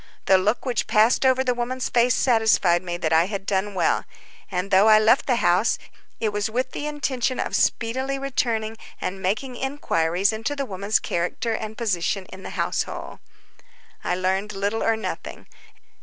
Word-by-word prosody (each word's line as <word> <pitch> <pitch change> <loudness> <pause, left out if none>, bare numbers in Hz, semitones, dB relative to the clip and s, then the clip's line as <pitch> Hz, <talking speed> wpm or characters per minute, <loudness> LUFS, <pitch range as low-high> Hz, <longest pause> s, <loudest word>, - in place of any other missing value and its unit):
The 190 -1 +5
look 210 +8 0
which 245 -3 -1
passed 225 +5 +4
over 260 0 +3
the 250 -1 +1
woman's 245 +1 -2
face 240 0 +3
satisfied 220 -8 +3
me 175 -1 -4
that 160 -2 -1
I 160 +1 +5
had 200 -1 -5
done 195 +1 -1
well; 175 - +1 0.5
and, 185 +1 -3
though 195 +3 +6
I 215 -1 +8
left 220 +4 +4
the 255 - +3
house, 185 -1 +2 0.4
it 220 - 0
was 205 0 -2
with 255 +3 -2
the 295 - -4
intention 265 -4 -1
of - - -2
speedily 260 +4 0
returning 230 -5 -1 0.2
and 190 +1 -4
making 230 +7 -2
inquiries 200 - 0
into 225 +7 -3
the 280 -1 -2
woman's 200 0 0
character 180 +7 -2
and 220 0 -5
position 195 -3 -1
in 190 - -10
the - - -7
household. - - -3 0.8
I 180 - 0
learned 190 +3 -1
little 200 +3 -1
or 225 -1 +2
nothing. 220 - -6
220 Hz, 170 wpm, -23 LUFS, 190-245 Hz, 0.8 s, I